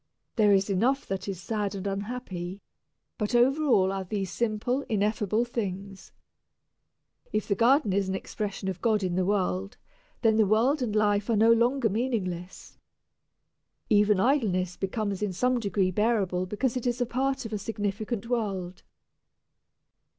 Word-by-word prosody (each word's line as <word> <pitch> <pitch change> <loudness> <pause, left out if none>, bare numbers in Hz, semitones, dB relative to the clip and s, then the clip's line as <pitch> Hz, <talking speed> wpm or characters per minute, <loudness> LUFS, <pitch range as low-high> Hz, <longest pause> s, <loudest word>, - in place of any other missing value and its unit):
There 210 -3 +4
is 195 -1 +3
enough 235 +8 +1
that 195 0 -4
is 195 -3 -4
sad 205 +1 -2
and 195 0 -6
unhappy, 200 -3 -4 0.6
but 210 +2 -1
over 265 +6 +4
all 190 -9 +4
are 195 0 -3
these 195 0 -3
simple, 235 +4 -1
ineffable 210 +1 +1
things. 195 -4 -5 1.2
If 215 0 -1
the 200 - +2
garden 235 0 +3
is 195 -1 +1
an 190 - -1
expression 200 0 -4
of 190 -2 -4
God 215 -4 +2
in 180 -2 -1
the 185 +1 0
world, 100 - -1 0.5
then 220 -1 +4
the 215 -2 +4
world 245 +8 +3
and 220 -4 -1
life 210 0 +2
are 230 - +3
no 225 +2 +5
longer 240 +2 +3
meaningless. 195 -6 -3 1.1
Even 210 -1 +4
idleness 190 -8 +1
becomes 200 0 -3
in 205 -3 -1
some 250 +6 +1
degree 200 -3 0
bearable 195 -3 +1
because 235 +6 -1
it 250 -1 -2
is 245 0 -1
a 245 - +1
part 265 +2 -1
of 225 - -6
a 210 - -2
significant 210 +2 -3
world. 195 -7 -2
210 Hz, 155 wpm, -27 LUFS, 190-235 Hz, 1.2 s, no